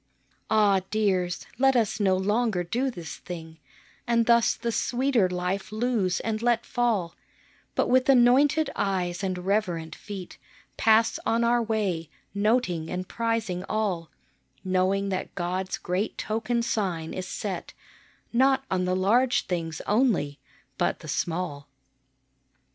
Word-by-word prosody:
Ah! 205 -3 +4
dears, 185 -5 0
let 270 0 +4
us 225 -2 +1
no 190 -2 +3
longer 205 -1 +1
do 245 +10 -1
this 170 -10 -7
thing, 160 -2 -9 0.5
And 235 -1 +3
thus 235 0 +4
the 235 0 -3
sweeter 245 -4 +1
life 180 +3 -2
lose 215 -5 0
and 220 -1 -2
let 240 -1 +2
fall; 225 -9 0 0.6
But - - +2
with 255 +1 +3
anointed 275 +4 +5
eyes 180 -2 -1
and 185 -1 -1
reverent 180 -4 -1
feet 195 -4 -9 0.4
Pass 225 0 +3
on 230 +1 +1
our 240 +1 +3
way, 200 -8 -1 0.2
noting 200 -6 +1
and 185 0 -4
prizing 225 -6 -2
all, 195 -7 -1 0.5
Knowing 190 +1 +1
that 185 -1 -4
God's 185 +1 -2
great 185 +5 -2
token 235 +2 -1
sign 185 -8 -2
is 185 0 -5
set, 190 -4 -5 0.6
Not 265 +2 +3
on 185 -1 +1
the 185 0 +1
large 235 +7 +2
things 165 -3 -3
only, 205 - +1 0.4
but - - 0
the - - -10
small. 160 -5 -3
200 Hz, 130 wpm, -26 LUFS, 180-235 Hz, 0.6 s, anointed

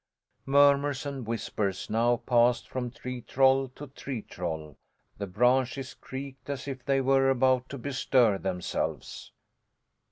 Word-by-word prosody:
Murmurs 140 0 +4
and 135 -5 -5
whispers 105 -4 -2
now 120 +2 +2
passed 120 0 +2
from 125 -1 -3
tree 125 +1 -7
troll 135 +2 +3
to 145 - -8
tree 135 -4 -6
troll; 80 -5 -5 0.4
the 100 - -3
branches 125 +6 +1
creaked 135 0 -9
as 140 -1 -4
if 130 -2 -5
they 135 -1 +2
were 135 0 +3
about 130 -1 +2
to 140 - -6
bestir 125 -5 +2
themselves. 90 -2 -4
130 Hz, 130 wpm, -28 LUFS, 115-135 Hz, 0.4 s, Murmurs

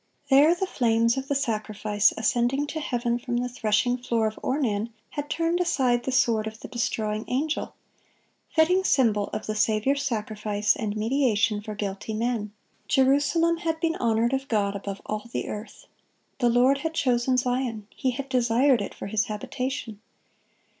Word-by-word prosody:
There, 295 +5 +6
the 385 - -1
flames 230 -7 +2
of 265 0 -4
the 285 - 0
sacrifice 215 -4 +1
ascending 250 +4 +1
to 315 - -2
heaven 240 -4 -1
from 240 0 -2
the 245 +1 -1
threshing 245 +1 0
floor 235 -3 0
of 215 0 -2
Ornan 235 -6 -1 0.2
had 290 0 -5
turned 335 +2 0
aside 255 -9 +1
the 265 - -1
sword 230 -4 +2
of 220 0 -8
the - - -7
destroying 215 -2 -2
angel(6)—fitting 320 +4 -2
symbol 225 - +3
of 215 - -5
the 215 - -2
Saviour's 220 +6 +1
sacrifice 215 -4 0
and 215 -2 -3
mediation 225 -3 +1
for 215 0 -7
guilty 205 +1 -4
men. 225 -2 -1 0.4
Jerusalem 290 +5 +3
had 325 -1 -2
been 330 0 0
honored 230 +1 +1
of 270 0 -1
God 205 -4 0
above 200 0 -6
all 215 +1 -4
the - - -3
earth. 210 +2 -8 0.5
The 240 - +3
Lord 255 +4 +4
had 320 +2 -3
"chosen 255 -1 +2
Zion," 245 -4 -1
He 265 - 0
had 265 +2 -4
"desired 250 0 +3
it 200 - -5
for - - -7
His 215 +1 0
habitation." 250 0 -4
240 Hz, 160 wpm, -26 LUFS, 215-270 Hz, 0.5 s, There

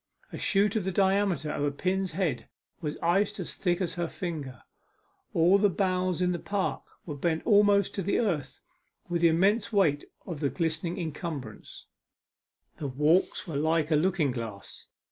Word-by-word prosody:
A - - -4
shoot 205 +2 +2
of 215 - +1
the 190 - -1
diameter 190 -5 +1
of 145 - -2
a 145 - +2
pin's 185 +5 -1
head 155 -10 -2 0.3
was 150 -3 -3
iced 195 +5 +1
as 180 - -4
thick 175 -2 0
as 185 -3 -1
her 175 -1 -2
finger; 155 -8 -6 0.7
all 175 +4 +4
the 205 0 +4
boughs 185 -1 0
in 180 - +2
the 175 - -2
park 200 +1 -2 0.2
were 155 - -5
bent 160 +3 -1
almost 205 -2 +4
to 195 - -2
the 195 +2 0
earth 175 - -2 0.5
with 170 -1 -1
the 170 - +6
immense 195 +8 +2
weight 165 -9 +2 0.2
of 170 -6 -6
the 145 -2 0
glistening 165 +1 -2
incumbrance; 155 - -6 0.9
the 145 - -4
walks 150 +7 +2
were 155 -4 -3
like 160 +1 +1
a - - +5
looking 165 -3 +2
glass. 115 -5 -7
175 Hz, 170 wpm, -28 LUFS, 150-190 Hz, 0.9 s, the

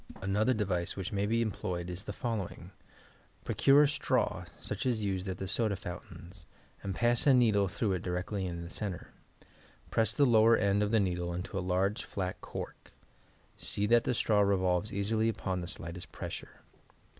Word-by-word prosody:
Another 100 +5 +1
device 90 -5 -1
which 95 -3 -4
may 100 0 0
be 115 +2 +2
employed 90 -5 -3
is 90 +2 -5
the - - -5
following: 110 -3 -4 0.7
Procure 140 +2 +5
a - - +5
straw 150 +2 0
such - - -4
as 115 -4 0
used 95 -1 -1
at 95 - -3
the 95 - -4
soda 100 +2 +1
fountaina, 90 -1 -8 0.4
and 95 -2 -4
pass 120 +5 +3
a 135 - +7
needle 105 -5 +4
through 100 +2 -1
it 90 - -2
directly 90 +2 -2
in 85 -1 -5
the 85 - -8
centre. 100 -4 -5 0.8
Press 110 -2 +3
the 140 +4 +3
lower 115 -2 +6
end 100 0 +2
of 105 - +1
the 110 0 +4
needle 90 -3 -1
into 90 +3 -5
a - - +1
large, 95 +3 0
flat 95 -2 -4
cork; - - -8 0.7
see 100 - 0
that 115 +2 +5
the 125 - 0
straw 105 -2 +2
revolves 95 0 +2
easily 110 +3 +1
upon 95 -4 -2
the 85 - -5
slightest 85 0 -7
pressure. - - -7
100 Hz, 180 wpm, -31 LUFS, 90-110 Hz, 0.8 s, a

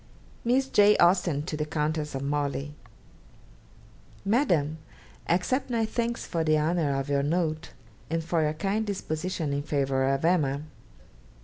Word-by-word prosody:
Miss 260 +3 +2
J. 210 -3 +5
Austen 175 -4 +3
to 155 - -4
the 150 - -1
Countess 150 -1 -2
of 135 - -3
Morley. 145 0 -2 1.5
'MADAM, 175 - +1 0.5
Accept 220 +11 +1
my 230 -2 +1
thanks 235 +1 -2
for 165 -1 -1
the 155 -1 +3
honour 150 -3 +1
of 135 - -4
your 140 -1 +1
note, 155 +1 -1 0.4
and 165 0 -1
for 165 0 0
your 150 0 +1
kind 195 +7 -1
disposition 180 -5 -3
in 140 - -1
favour 135 -2 0
of 135 +3 0
"Emma." 150 -5 +2
155 Hz, 140 wpm, -27 LUFS, 145-185 Hz, 1.5 s, J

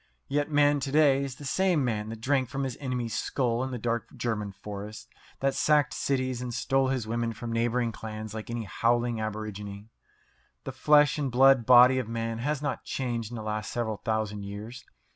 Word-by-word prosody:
Yet 145 +2 0
man 145 -1 +4
to 135 0 -3
day 140 -2 +4
is 135 -2 -5
the 145 - -10
same 175 -1 +2
man 110 -3 -2
that 110 0 -7
drank 130 0 +1
from 140 0 -3
his 130 -2 -3
enemy's 125 -4 -3
skull 120 -2 0
in 130 - -3
the 125 - -4
dark 120 0 -2
German 105 -4 -2
forests, 105 +2 -8 0.3
that 135 0 +2
sacked 150 -3 +3
cities, 130 -2 -1
and 125 -1 -4
stole 135 +3 +1
his 130 -4 -1
women 115 +1 -2
from 115 +1 -6
neighbouring 120 +1 +1
clans 110 -1 -7
like 110 0 -6
any 120 -1 -3
howling 120 +3 0
aborigine. 105 -1 -6 0.7
The - - -5
flesh 150 +2 +4
and 140 -3 -1
blood 130 -1 +5
body 125 +1 +8
of 120 -3 -4
man 115 0 -3
has 145 +3 -2
not 145 -2 -2
changed 120 -4 -3
in - - -6
the 110 - -5
last 105 0 -3
several 110 -3 -2
thousand 110 -2 -2
years. 105 +5 -8
120 Hz, 195 wpm, -28 LUFS, 110-135 Hz, 0.7 s, body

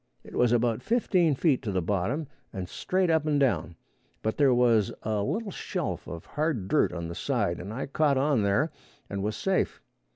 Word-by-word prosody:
It - - -13
was 125 -1 +3
about 120 -1 +2
fifteen 185 - +2
feet 140 -2 +2
to 105 - -3
the 95 - +1
bottom 100 - -1 0.3
and 95 -3 -5
straight 185 - 0
up 160 -1 +2
and 145 -2 +2
down, 85 - +1 0.5
but 110 - 0
there 140 -3 +5
was 120 -4 +3
a 105 -1 0
little 205 - -2
shelf - - -4
of 85 -1 -7
hard 150 - -1
dirt - - +3
on 85 -1 -4
the 85 - -5
side, - - -1
and 95 +4 -6
I 125 +5 -3
caught 140 0 +2
on 140 -3 +2
there 100 +11 +2 0.4
and 100 -1 -2
was 105 +2 -1
safe. 190 - 0
120 Hz, 195 wpm, -28 LUFS, 100-155 Hz, 0.5 s, there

